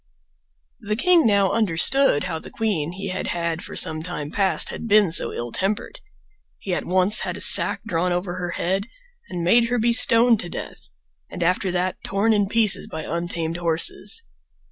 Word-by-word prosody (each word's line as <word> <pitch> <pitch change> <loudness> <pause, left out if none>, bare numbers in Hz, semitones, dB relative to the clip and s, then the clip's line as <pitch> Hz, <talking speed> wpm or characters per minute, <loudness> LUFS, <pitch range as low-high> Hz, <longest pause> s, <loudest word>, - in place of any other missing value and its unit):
The 210 -3 -3
king 340 +2 +3
now 200 -2 +2
understood 215 - +3
how 160 - -4
the - - -11
queen 175 -8 -3
he 195 +1 -6
had 185 - -4
had 170 -1 -3
for - - -8
some 155 0 +1
time 155 -3 -6
past 195 -2 +1
had - - -7
been 205 -4 +3
so - - +2
ill 120 0 -6
tempered. 195 - -3 0.6
He 190 - -5
at - - -4
once 185 +4 +2
had - - -3
a - - -7
sack - - +5
drawn 180 -4 -1
over 175 0 -3
her 175 -1 -4
head 195 +4 -2 0.4
and 175 -1 -5
made 230 +7 +3
her 245 - 0
be 235 +1 +1
stoned 230 -1 +5
to 175 - -5
death, - - -9 0.4
and 180 - -5
after 185 +2 0
that 185 +1 -2
torn 205 +3 0
in 205 -2 +1
pieces 220 -1 +1
by 160 0 -7
untamed 170 0 -4
horses. 175 - 0
185 Hz, 185 wpm, -21 LUFS, 170-215 Hz, 0.6 s, sack